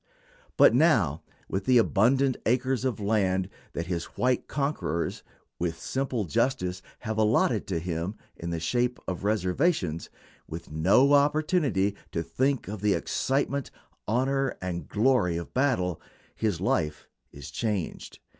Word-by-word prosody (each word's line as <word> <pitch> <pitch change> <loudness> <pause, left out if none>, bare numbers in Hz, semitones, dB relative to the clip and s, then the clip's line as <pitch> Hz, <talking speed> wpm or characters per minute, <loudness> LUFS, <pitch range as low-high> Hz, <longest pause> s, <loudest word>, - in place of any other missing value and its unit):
But - - +7
now, 110 - +3 0.3
with 95 0 -3
the 130 -1 +5
abundant 125 +5 +3
acres 130 +1 +1
of 125 -6 -1
land 95 -3 +1 0.2
that 85 - -3
his 85 -1 -2
white 125 0 +1
conquerors, 140 - -2 0.4
with 85 -1 -1
simple 130 -3 -2
justice, 95 - 0 0.2
have 110 -2 -3
allotted 110 0 +2
to 95 - -1
him 85 +3 -3 0.2
in 85 - -6
the 85 -1 -2
shape 125 +9 0
of 95 0 -4
reservations, 100 - 0 0.4
with - - -8
no 100 - +4
opportunity 145 - +2 0.2
to 85 - -1
think 130 - 0
of 105 -1 -6
the 105 -1 +3
excitement, 140 0 -1 0.4
honor, 135 +4 +1
and 90 -2 -4
glory 105 -7 +2
of 85 - -7
battle, 115 - +1 0.3
his 105 -7 -1
life 75 -5 -1 0.2
is 70 -1 -10
changed. 105 -1 -3
105 Hz, 135 wpm, -27 LUFS, 90-130 Hz, 0.4 s, But